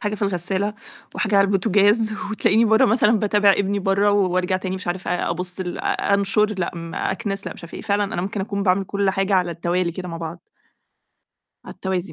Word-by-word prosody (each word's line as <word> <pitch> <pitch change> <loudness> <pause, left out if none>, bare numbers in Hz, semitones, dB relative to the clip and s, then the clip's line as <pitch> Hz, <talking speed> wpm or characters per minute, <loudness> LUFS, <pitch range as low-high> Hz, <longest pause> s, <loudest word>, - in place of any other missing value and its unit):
حاجة 210 -2 -2
في 210 - -7
الغسالة 195 +2 -1 0.4
وحاجة 210 -1 0
على 195 - +6
البوتوجاز 205 +2 +3 0.2
وتلاقيني 220 +1 +3
بَرّه 220 0 +4
مثلًا 220 0 +3
باتابع 205 -1 +3
ابني 200 +1 0
بَرّه 195 +1 +2
و 200 -2 +2
وأرجع 185 +1 +1
تاني 185 0 -4
مش 185 - -9
عارفة 175 -1 -2
ابُص 180 +2 -3
ال 180 -1 -4
أنشر، 200 +2 +1
لأ، 175 - -1
إمم 165 -1 -7
أكنُس، 195 +1 -3
لأ، - - -4
مش - - -13
عارفة 170 - -11
إيه، - - -8
فعلًا 205 -1 +1
أنا 175 - -1
ممكن 200 +1 -3
أكون 200 0 -3
باعمِل 190 0 +2
كل 200 0 0
حاجة 195 +1 0
على 180 -2 +2
التوالي 170 +1 -1
كده 180 0 -6
مع 165 - -5
بعض. 165 +1 -8 1.2
على - - -9
التوازي 190 -1 -3
195 Hz, 205 wpm, -22 LUFS, 180-205 Hz, 1.2 s, على